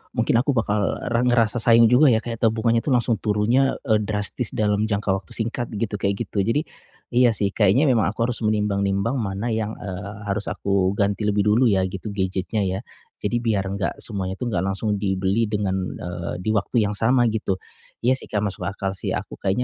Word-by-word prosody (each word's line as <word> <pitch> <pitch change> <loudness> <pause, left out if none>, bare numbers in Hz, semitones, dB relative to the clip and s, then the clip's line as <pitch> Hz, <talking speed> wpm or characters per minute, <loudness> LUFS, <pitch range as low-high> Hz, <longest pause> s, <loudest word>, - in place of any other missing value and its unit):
mungkin 115 -1 +2
aku 140 +2 0
bakal 105 -3 0 0.2
re 115 - +2
ngerasa 120 -1 +2
sayang 115 0 +5
juga 135 +5 +6
ya 115 -3 +3
kayak 115 -1 -5
tabungannya 115 +1 +2
tuh 130 +2 +1
langsung 120 -2 +1
turunnya, 110 +6 +2
eee, 110 -6 +2
drastis 105 +3 -2
dalam 105 0 +1
jangka 100 -1 -1
waktu 95 -3 -3
singkat 115 +1 -2
gitu 105 -1 -2
kayak 100 0 0
gitu. 100 - -4
Jadi, 115 +10 +1 0.5
iya 120 -2 +4
sih 100 -1 +1
kayaknya 105 +6 +3
memang 125 -8 +3
aku - - 0
harus 120 - -3
menimbang-nimbang 105 +2 0
mana 105 +2 -2
yang, 110 0 -2
eee, 100 +2 -7
harus 105 0 -2
aku 100 -1 0
ganti 100 +1 0
lebih 105 -1 +2
dulu 110 +5 +4
ya 95 -4 +3
gitu, 95 +3 -5
gadgetnya 95 +1 -1
ya. 95 0 -1 0.4
Jadi 120 +3 0
biar 105 -4 +1
enggak 100 0 -3
semuanya 95 -3 -3
itu 125 - -2
enggak 90 -3 0
langsung 105 +2 -1
dibeli 95 +3 0
dengan, 100 -3 0 0.2
eee, 90 -1 -5
di - - -7
waktu 105 +3 +1
yang - - -2
sama 120 +4 +3
gitu. 105 -3 -1 0.5
Iya 130 +2 +3
sih, - - -7
Kak, 105 -1 -1
masuk 100 -2 -3
akal 100 -1 -3
sih. 95 - -3
Aku - - -6
kayaknya 100 +6 0
105 Hz, 200 wpm, -23 LUFS, 100-115 Hz, 0.5 s, juga